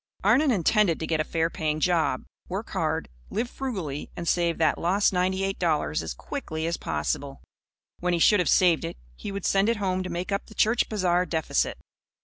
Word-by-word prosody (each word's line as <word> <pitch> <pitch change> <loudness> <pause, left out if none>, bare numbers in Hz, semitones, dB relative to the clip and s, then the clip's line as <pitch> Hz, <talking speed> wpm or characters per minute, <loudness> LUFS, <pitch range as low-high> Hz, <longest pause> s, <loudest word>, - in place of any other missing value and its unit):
Arnon 250 +10 +4
intended 200 -4 +3
to 160 - -2
get 160 -1 0
a - - +2
fair 165 +1 0
paying 155 -1 -1
job, 170 -1 +1 0.3
work - - -4
hard, - - -1 0.2
live 230 +4 -1
frugally 190 - -4
and 170 -1 -5
save 170 -1 +2
that 160 -1 +2
lost 195 +4 +2
ninety 185 +1 +1
eight 195 0 -2
dollars 155 - +1
as 80 -6 -5
quickly 160 - -5
as 170 +1 0
possible. 135 - -3 0.6
When 180 0 0
he - - +2
should 205 +4 +5
have 180 - +1
saved 175 -4 +4
it, - - -5 0.2
he 200 - -6
would 200 -1 -5
send 195 +2 +3
it 230 - +1
home 185 -2 0
to 185 - -4
make 175 +3 -4
up 200 - -2
the 215 - -14
church 225 +3 +2
bazaar 180 -4 +1
deficit. 160 -1 0
180 Hz, 200 wpm, -26 LUFS, 160-200 Hz, 0.6 s, should